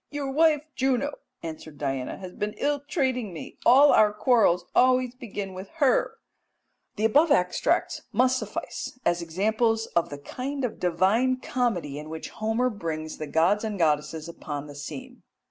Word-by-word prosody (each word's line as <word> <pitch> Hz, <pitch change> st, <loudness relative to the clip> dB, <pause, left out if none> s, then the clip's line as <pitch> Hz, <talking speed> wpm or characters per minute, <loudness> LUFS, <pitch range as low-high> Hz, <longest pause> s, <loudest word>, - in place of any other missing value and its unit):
"'Your 285 Hz, -2 st, -3 dB
wife, 305 Hz, 0 st, +3 dB
Juno,' 270 Hz, +2 st, +1 dB, 0.3 s
answered 155 Hz, -2 st, -8 dB
Diana, 135 Hz, -3 st, -3 dB
'has 185 Hz, -1 st, -9 dB
been 210 Hz, 0 st, -3 dB
ill 290 Hz, 0 st, 0 dB
treating 260 Hz, -6 st, -1 dB
me; 165 Hz, -, -9 dB
all 275 Hz, +4 st, +8 dB
our 210 Hz, -1 st, +5 dB
quarrels 210 Hz, -5 st, +3 dB
always 255 Hz, -1 st, +3 dB
begin 205 Hz, -6 st, -6 dB
with 185 Hz, +1 st, -8 dB
her.'" 285 Hz, -5 st, +2 dB, 0.8 s
The 215 Hz, -, 0 dB
above 295 Hz, +9 st, +4 dB
extracts 180 Hz, -10 st, +1 dB
must 255 Hz, +3 st, +3 dB
suffice -, -, -5 dB
as 175 Hz, 0 st, +2 dB
examples 220 Hz, +6 st, +1 dB
of 170 Hz, -, +2 dB
the 145 Hz, -, -6 dB
kind 260 Hz, -, -4 dB
of 235 Hz, -, -5 dB
divine 195 Hz, +9 st, +2 dB
comedy 210 Hz, -, -2 dB
in 155 Hz, +1 st, -9 dB
which 160 Hz, 0 st, -7 dB
Homer 225 Hz, +4 st, 0 dB
brings 160 Hz, -6 st, -5 dB
the 155 Hz, -, -4 dB
gods 170 Hz, +8 st, +2 dB
and 215 Hz, -2 st, -3 dB
goddesses 155 Hz, -1 st, 0 dB
upon 150 Hz, -3 st, -6 dB
the 145 Hz, -, -10 dB
scene. 255 Hz, -, -8 dB
215 Hz, 160 wpm, -26 LUFS, 165-255 Hz, 0.8 s, all